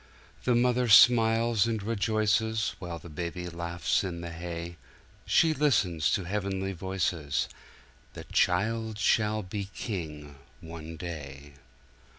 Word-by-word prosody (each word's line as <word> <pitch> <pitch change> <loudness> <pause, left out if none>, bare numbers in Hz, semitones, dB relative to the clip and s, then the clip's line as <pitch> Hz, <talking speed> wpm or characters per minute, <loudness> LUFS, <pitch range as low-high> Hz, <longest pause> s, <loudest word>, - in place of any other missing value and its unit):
"The 125 - +3
Mother 125 +1 +2
smiles 115 0 +6
and 110 -3 -2
rejoices 110 0 0
While 85 -2 -5
the 85 - -12
Baby 85 +2 -5
laughs 85 +4 -1
in 85 -3 -4
the 85 0 -6
hay; 85 0 -6 0.5
She 160 -1 +4
listens 105 - +2
to 95 - 0
heavenly 95 0 -2
voices: 90 -5 -1 0.7
'The - - -8
child 110 +4 +1
shall 105 0 +2
be 100 +1 -5
King, 75 -8 -6 0.2
one 80 0 -9
day.'" 75 -4 -8
95 Hz, 120 wpm, -28 LUFS, 85-110 Hz, 0.7 s, smiles